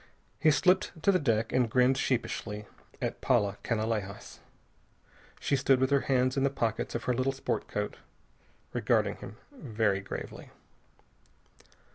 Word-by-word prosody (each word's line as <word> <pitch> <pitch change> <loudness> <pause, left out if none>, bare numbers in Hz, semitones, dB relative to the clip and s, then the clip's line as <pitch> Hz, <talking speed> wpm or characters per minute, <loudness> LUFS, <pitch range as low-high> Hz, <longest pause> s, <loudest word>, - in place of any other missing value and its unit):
He 155 - +5
slipped 180 +5 +3
to 200 - +5
the 185 - +3
deck 115 -5 0
and 125 -3 +2
grinned 125 +3 +4
sheepishly 115 -5 -2 0.3
at - - -3
Paula 105 -6 +2
Canalejas. 110 -3 -3 1.0
She 140 - +1
stood 135 -1 +3
with 130 +1 +1
her 140 - +5
hands 130 -1 +3
in 135 - +1
the 140 - +3
pockets 115 -5 -2
of 120 - -2
her 125 - +1
little 130 +2 +1
sport 135 0 -3
coat, - - -3 0.8
regarding - - +1
him - - -10 0.2
very 110 - 0
gravely. 100 - -7
125 Hz, 140 wpm, -30 LUFS, 110-135 Hz, 1.0 s, He